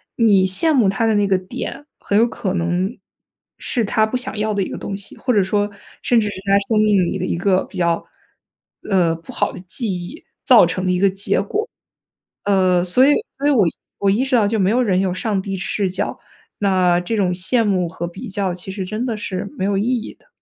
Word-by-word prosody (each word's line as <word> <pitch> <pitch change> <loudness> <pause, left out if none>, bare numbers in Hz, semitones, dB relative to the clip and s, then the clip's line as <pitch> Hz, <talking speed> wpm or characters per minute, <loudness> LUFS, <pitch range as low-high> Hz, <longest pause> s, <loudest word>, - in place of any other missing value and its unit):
你 205 -5 +4
羡 305 - +2
慕 235 -8 +4
他 200 +4 0
的 220 -1 +2
那 205 0 +3
个 195 -1 +2
点， 245 +9 -7
很 200 - 0
有 230 +2 +5
可 195 -5 -3
能 180 +4 -1 0.6
是 235 -4 -1
他 215 +1 +2
不 220 +4 -2
想 240 -3 -4
要 215 0 0
的 200 - 0
一 - - -1
个 - - -6
东 195 - -5
西， 200 0 -10
或 255 - -1
者 205 - +4
说 205 +2 0 0.3
甚 240 -2 +3
至 210 - 0
是 - - -7
他 200 0 +4
生 220 -2 +2
命 200 -4 +3
里 195 - -2
的 185 - -2
一 170 - -2
个 185 +1 +2
比 - - -12
较， 170 -1 +1 0.9
呃， 175 -5 +2
不 165 0 -11
好 - - -1
的 - - -8
记 210 +5 -3
忆 180 - -6 0.2
造 250 -9 +7
成 185 +2 -2
的 185 - +2
一 180 - +1
个 195 0 +4
结 195 +1 0
果。 430 - -2 0.8
呃， 185 -3 +3
所 250 +9 +3
以 290 - +5 0.3
所 280 - -1
以 - - +5
我 230 -10 +4 0.3
我 200 -1 +2
意 230 +7 +2
识 265 -1 -1
到 210 -4 +4
就 220 0 0
没 190 +1 +2
有 250 +3 +2
人 190 -5 +1
有 190 -2 0
上 200 0 -1
帝 195 0 -4
视 190 +1 -2
角， 190 +3 -2 0.4
那 185 -3 +2
这 180 +6 -3
种 185 -4 +1
羡 225 +7 +1
慕 190 -4 +1
和 170 +1 -5
比 175 - -9
较 195 -2 -1
其 180 +2 -7
实 190 -2 -4
真 215 +5 -3
的 235 -3 -2
是 195 -1 -4
没 185 - -1
有 200 0 0
意 200 - 0
义 245 -3 -2
的。 - - -31
200 Hz, 255 characters per minute, -20 LUFS, 185-220 Hz, 0.9 s, 造